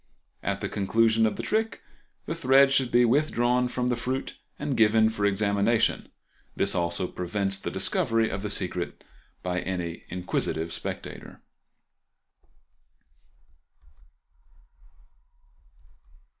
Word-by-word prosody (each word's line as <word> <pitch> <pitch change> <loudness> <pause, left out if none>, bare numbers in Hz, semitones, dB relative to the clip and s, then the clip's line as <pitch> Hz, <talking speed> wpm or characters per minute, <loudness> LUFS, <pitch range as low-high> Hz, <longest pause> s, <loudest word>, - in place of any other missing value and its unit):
At - - -2
the - - -1
conclusion 110 +2 +2
of 110 - -2
the - - -5
trick 220 +1 -1 0.4
the - - -3
thread 135 -3 +5
should 130 -3 +2
be 120 +1 +5
withdrawn 125 -2 +2
from 125 0 -2
the 125 - +1
fruit 130 +3 -3 0.2
and 140 - -2
given 110 0 +4
for 105 -2 -1
examination; 100 +2 +1 0.5
this - - +1
also 85 +1 -1
prevents 95 +2 -2
the - - -4
discovery 115 0 +1
of 95 -1 -4
the 105 - -3
secret 90 -3 -3 0.4
by 90 0 -1
any 90 -3 -4
inquisitive 85 -2 -1
spectator. - - -7
110 Hz, 110 wpm, -27 LUFS, 95-125 Hz, 0.5 s, thread